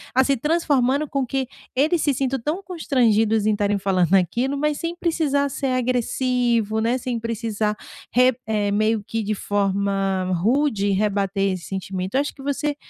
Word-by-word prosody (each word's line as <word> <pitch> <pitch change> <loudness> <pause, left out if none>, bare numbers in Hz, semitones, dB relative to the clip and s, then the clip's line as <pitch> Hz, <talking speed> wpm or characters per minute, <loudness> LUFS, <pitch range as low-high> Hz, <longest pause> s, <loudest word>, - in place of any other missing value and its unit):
assim, 265 +1 +3
transformando 290 -1 +1
com 275 -2 -1
que 265 +2 -2 0.3
eles 310 +5 +2
se 285 - +2
sintam 270 0 -1
tão 310 +11 -3
constrangidos 225 - +1
em 215 - +3
estarem 205 -1 +1
falando 185 -3 +1
naquilo, 235 +9 +2
mas 300 +1 0
sem 335 0 -3
precisar 305 -5 0
ser 270 +1 -3
agressivo, 245 -3 0
né, 230 +3 +1
sem 245 -2 -3
precisar 225 -2 -2 0.4
re 250 +2 +4
é 210 -2 0
meio 215 +1 +1
que 225 +2 -3
de 210 +1 -1
forma 195 -2 0
rude 215 - +1
rebater 195 -1 0
esse 180 -2 -6
sentimento. 190 +1 -4
Eu 275 - +4
acho 290 - -4
que - - -13
você 285 +1 -1
230 Hz, 165 wpm, -22 LUFS, 205-275 Hz, 0.4 s, re